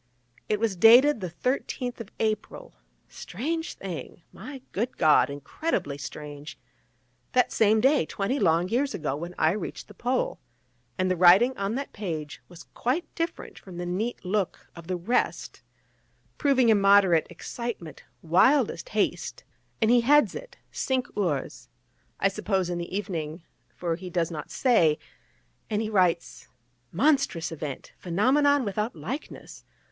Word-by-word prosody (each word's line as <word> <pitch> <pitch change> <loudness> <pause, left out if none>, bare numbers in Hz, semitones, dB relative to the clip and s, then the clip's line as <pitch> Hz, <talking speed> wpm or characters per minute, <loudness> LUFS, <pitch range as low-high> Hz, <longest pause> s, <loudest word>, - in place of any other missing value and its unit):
It 210 - +1
was 220 -3 0
dated 240 +9 +7
the 180 - -3
13th 250 - -3
of 225 -3 -7
April 215 -1 -3 0.3
strange 320 - -4
thing, 170 -3 -7
my 260 +5 -9
good 235 +6 -3
God, 155 -2 +5
incredibly 145 - -3
strange 145 +1 -8 0.8
that 250 -1 +3
same 220 0 +3
day, 265 - +3
twenty 220 +8 -2
long 170 -2 +3
years 265 +7 0
ago, 150 -5 -2
when 170 +4 -7
I 155 - +3
reached 210 - -5
the 210 - -13
Pole; 250 +5 -1 0.6
and 185 0 +1
the - - +2
writing 185 +9 +6
on 200 +3 -2
that 275 +1 -5
page 160 -7 -5
was 175 -1 -12
quite 265 +9 -2
different 335 0 -4
from 185 -3 -11
the 175 - -4
neat 195 +6 -3
look 195 0 -2
of 170 -1 -11
the 185 - -1
rest, 205 +9 -1 0.8
proving 260 -4 +3
immoderate 200 -5 +5
excitement, 180 -1 -6 0.2
wildest 260 - +3
haste; - - -1 0.4
and 225 0 +3
he 245 -1 +5
heads 295 +5 +4
it - - -9
'Cinq 260 -1 -2
Heures,' 170 -9 -2 0.5
I - - +3
suppose 195 -2 -1
in 175 - -2
the 170 - -5
evening, 165 -5 -4 0.3
for 170 -2 -2
he 180 +2 -8
does 170 -1 -1
not 155 -2 -6
say: 170 - +3 0.7
and 210 -1 0
he 220 0 -2
writes: 180 -4 +1 0.4
'Monstrous 265 - +1
event! 145 -3 -6
phenomenon 265 +10 +2
without 210 +2 -2
likeness! 230 - -7
200 Hz, 140 wpm, -26 LUFS, 170-245 Hz, 0.8 s, dated